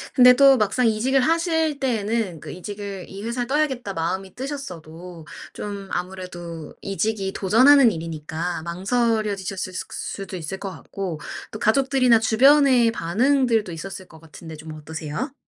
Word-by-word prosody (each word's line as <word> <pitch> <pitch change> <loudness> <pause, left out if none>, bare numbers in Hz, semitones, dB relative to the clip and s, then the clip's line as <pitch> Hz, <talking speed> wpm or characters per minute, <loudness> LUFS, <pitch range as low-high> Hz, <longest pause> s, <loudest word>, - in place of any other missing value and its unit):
근데 250 -1 +8
또 275 +1 +6
막상 230 +3 +2
이직을 240 +5 +2
하실 320 0 +1
때에는 220 - -1
그 - - -9
이직을 200 0 -7
이 195 +1 -8
회사를 240 +2 -2
떠야겠다 265 -7 -1
마음이 185 +3 -3
뜨셨어도 180 - -8 0.3
좀 200 -1 -6
아무래도 175 -3 -6
이직이 195 0 -2
도전하는 250 +6 +6
일이니까 165 0 -4
망설여지셨을 195 0 -1
수 185 - -4
수도 195 -1 -5
있을 175 +3 -5
것 200 - -5
같고 175 +1 -6 0.3
또 215 - -7
가족들이나 255 0 +3
주변의 250 +1 +5
반응들도 225 +3 +1
있었을 185 +3 -7
것 160 - -15
같은데 160 0 -11
좀 155 +1 -9
어떠세요? 155 - -5
200 Hz, 335 characters per minute, -23 LUFS, 175-250 Hz, 0.3 s, 근데